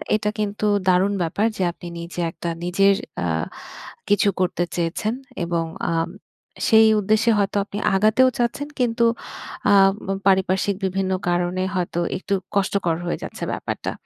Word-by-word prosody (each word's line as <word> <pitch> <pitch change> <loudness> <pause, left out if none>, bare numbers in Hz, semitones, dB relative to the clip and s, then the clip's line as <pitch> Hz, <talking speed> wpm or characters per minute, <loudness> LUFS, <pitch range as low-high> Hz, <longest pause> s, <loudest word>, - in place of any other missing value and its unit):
এটা 210 0 0
কিন্তু 210 0 -2 0.2
দারুণ 185 +2 +3
ব্যাপার 170 +6 0
যে 190 - 0
আপনি 175 0 -11
নিজে 170 +1 -7
একটা 170 - -5
নিজের 195 +3 +3 0.3
আ - - 0 0.8
কিছু 205 0 +3
করতে 180 -1 +1
চেয়েছেন 175 +6 -1 0.3
এবং 170 -1 0 0.3
আ 170 - 0 0.7
সেই 220 -1 +7
উদ্দেশ্যে 215 +3 +3
হয়তো 200 0 0
আপনি 205 - -7 0.2
আগাতেও 215 +6 +4
চাচ্ছেন 240 +4 -1
কিন্তু 235 -1 +2 0.7
আ - - +6 0.3
ম - - -5 0.2
পারিপার্শ্বিক 190 +1 +2
বিভিন্ন 190 0 -1 0.2
কারণে 175 +1 0
হয়তো 175 -1 -1 0.2
একটু 195 +2 -3 0.2
কষ্টকর 195 -3 +1
হয়ে 175 - -1
যাচ্ছে - - -7
ব্যাপারটা। - - -4
195 Hz, 140 wpm, -22 LUFS, 175-210 Hz, 0.8 s, সেই